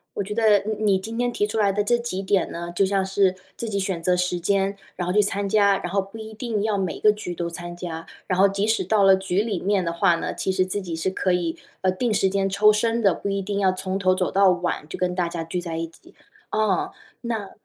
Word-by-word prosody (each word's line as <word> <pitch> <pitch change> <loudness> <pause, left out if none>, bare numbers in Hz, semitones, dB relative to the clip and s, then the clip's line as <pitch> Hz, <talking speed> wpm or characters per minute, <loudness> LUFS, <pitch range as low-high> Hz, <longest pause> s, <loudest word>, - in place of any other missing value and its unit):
我 200 - -1
觉 210 +2 -5
得 215 -3 +5
你 210 +2 -4
你 195 -3 +3
今 225 +4 -6
天 245 0 +1
提 210 -3 0
出 220 +1 -4
来 200 -2 +3
的 205 +1 0
这 240 +1 +3
几 235 -5 -4
点 195 -1 +1
呢， 170 0 -5
就 195 - +3
像 195 0 +1
是 190 -1 +2 0.2
自 230 - -4
己 200 - -1
选 190 -3 -2
择 180 +1 +3
时 180 0 0
间， 195 +2 +1 0.2
然 175 -1 -2
后 180 - 0
去 210 - +5
参 200 0 -1
加， 200 -1 +4
然 175 - -5
后 195 +1 +2
不 195 +3 -11
一 220 0 -8
定 220 -2 -2
要 215 -2 0
每 190 -3 -2
个 210 - +5
局 205 -4 -6
都 170 0 -3
参 175 0 -7
加， 165 -2 -6 0.2
然 185 - 0
后 195 +1 +6
即 200 +2 -1
使 220 -2 +2
到 205 +2 +2
了 195 0 +7
局 190 0 0
里 210 -4 -2
面 195 -1 +1
的 170 - -1
话 175 0 +3
呢， 165 - -3
其 190 - -1
实 185 0 +1
自 195 +2 -3
己 175 -4 -5
是 175 +3 0
可 190 0 0
以， 175 -2 -1 0.2
呃， 185 - +2
定 225 +4 0
时 195 -2 +2
间 195 0 0
抽 210 +2 +5
身 230 +2 +1
的， 200 -4 +4
不 200 - -4
一 195 0 -1
定 200 +1 -3
要 190 -2 +3
从 185 +1 -3
头 185 -1 +3
走 185 -1 0
到 195 -1 +4
晚， 175 -4 -1
就 - - -6
跟 180 -1 0
大 175 -2 0
家 170 -1 -4
聚 175 +2 -3
在 165 -2 -5
一 165 0 -2
起。 165 - -20 0.4
啊， 215 -4 0 0.3
那 225 -5 -4
195 Hz, 290 characters per minute, -23 LUFS, 180-210 Hz, 0.4 s, 了